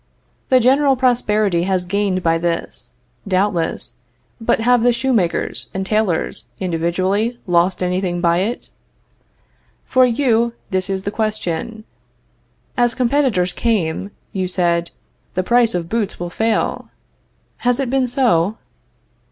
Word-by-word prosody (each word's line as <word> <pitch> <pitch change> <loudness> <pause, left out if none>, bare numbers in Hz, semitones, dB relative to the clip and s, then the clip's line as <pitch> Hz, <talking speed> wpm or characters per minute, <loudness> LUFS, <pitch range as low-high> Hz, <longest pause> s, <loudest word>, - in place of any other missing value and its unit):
The 255 - +6
general 270 +3 +4
prosperity 215 -7 +2
has 185 -2 0
gained 190 0 0
by 165 0 +2
this, 170 0 -3 0.4
doubtless, 185 -3 -1 0.5
but 225 - +2
have 245 +1 +4
the 245 +1 +4
shoemakers 235 -7 0
and 190 0 -2
tailors, 210 -4 -1
individually, 185 +7 0
lost 175 +1 +2
anything 180 -1 -1
by 170 0 +2
it? 220 +6 -3 1.1
For 255 0 +4
you, 235 -2 +2 0.2
this 185 0 -1
is 190 -1 -2
the 205 - -2
question. 215 -1 -3 0.9
As 240 -1 +2
competitors 245 -8 +1
came, 195 -5 -1 0.2
you 185 -1 -1
said: 170 -2 +1 0.5
The 185 - +1
price 235 0 +3
of 170 -2 -2
boots 215 0 -2
will 175 0 -4
fail. 220 +2 -1 0.7
Has 245 +1 +1
it 265 -3 -1
been 265 -1 +2
so? 225 - +2
205 Hz, 125 wpm, -19 LUFS, 180-235 Hz, 1.1 s, The